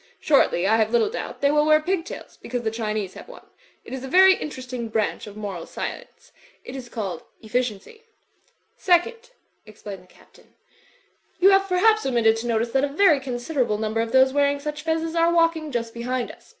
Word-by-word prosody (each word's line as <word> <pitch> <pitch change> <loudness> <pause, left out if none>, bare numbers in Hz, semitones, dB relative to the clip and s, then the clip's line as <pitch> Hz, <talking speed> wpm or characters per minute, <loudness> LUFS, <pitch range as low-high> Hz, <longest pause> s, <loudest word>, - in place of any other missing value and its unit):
Shortly, 270 - +2
I 220 +3 +3
have 220 -1 +2
little 235 - +2
doubt, - - -6
they 280 0 +3
will 300 0 +3
wear 310 0 +6
pigtails, 360 +2 -4
because 245 0 -5
the 220 - -1
Chinese 215 -4 -3
have - - -11
won. - - -13 0.4
It - - -9
is 265 -1 -5
a - - -5
very 380 +6 +7
interesting 255 -8 -6
branch 220 -1 -2
of 205 0 -11
moral 195 -5 -6
science. - - -8 0.3
It 250 - -8
is 255 -2 -8
called 195 -9 -5 0.2
Efficiency. 245 - -3 0.7
"Second," 455 +7 +1 0.4
explained 205 -2 -10
the 185 - -22
Captain, - - -23 0.8
"you 385 +2 +6
have, 390 0 +3
per 365 - +1
haps, 435 +3 +4
omitted 235 -4 +2
to 230 +2 -5
notice 230 0 0
that 270 +2 +1
a - - +2
very 305 0 +4
considerable 250 -2 -2
num 215 0 -3
ber 225 - +1
of 230 0 -3
those 260 +1 +4
wearing 285 0 +2
such 300 +1 -5
fezzes 325 0 -1
are 335 0 +3
walking 330 -2 +1
just 230 -2 -3
be 235 - -7
hind 250 0 -2
us. - - -20
260 Hz, 200 wpm, -23 LUFS, 225-320 Hz, 0.8 s, very